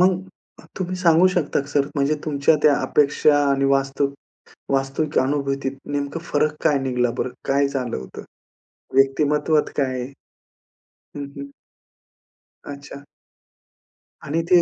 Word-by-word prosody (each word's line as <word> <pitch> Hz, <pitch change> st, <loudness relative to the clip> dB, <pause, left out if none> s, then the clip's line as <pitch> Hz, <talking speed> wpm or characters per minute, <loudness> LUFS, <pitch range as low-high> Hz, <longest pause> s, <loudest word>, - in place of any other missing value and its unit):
मग 185 Hz, 0 st, +3 dB, 0.6 s
तुम्ही 185 Hz, 0 st, -3 dB
सांगू 175 Hz, 0 st, +5 dB
शकता 155 Hz, -4 st, +1 dB
का 140 Hz, -, -8 dB
सर, 140 Hz, 0 st, +1 dB
म्हणजे 140 Hz, +2 st, +2 dB
तुमच्या 150 Hz, +1 st, +2 dB
त्या 150 Hz, -, +6 dB
अपेक्षा 145 Hz, 0 st, +3 dB
आणि 140 Hz, 0 st, +1 dB
वास्तव 135 Hz, +1 st, 0 dB, 0.7 s
वास्तविक 135 Hz, +3 st, 0 dB
अनुभूतीत 135 Hz, 0 st, -1 dB
नेमकं 145 Hz, +2 st, -2 dB
फरक 155 Hz, 0 st, +1 dB
काय 145 Hz, -2 st, +3 dB
निघाला 125 Hz, -2 st, 0 dB
बरं? 130 Hz, -, -1 dB, 0.2 s
काय 140 Hz, +1 st, +3 dB
झालं 130 Hz, -, -3 dB
होतं? 65 Hz, -, -9 dB, 0.7 s
व्यक्तिमत्वात 150 Hz, +3 st, +2 dB
काय 130 Hz, -3 st, -1 dB, 1.1 s
हं, 145 Hz, -1 st, -4 dB
हं. 140 Hz, 0 st, -8 dB, 1.1 s
अच्छा. 140 Hz, 0 st, -9 dB, 1.2 s
आणि 160 Hz, +4 st, 0 dB
ते 175 Hz, -1 st, +7 dB
140 Hz, 120 wpm, -22 LUFS, 135-150 Hz, 1.2 s, ते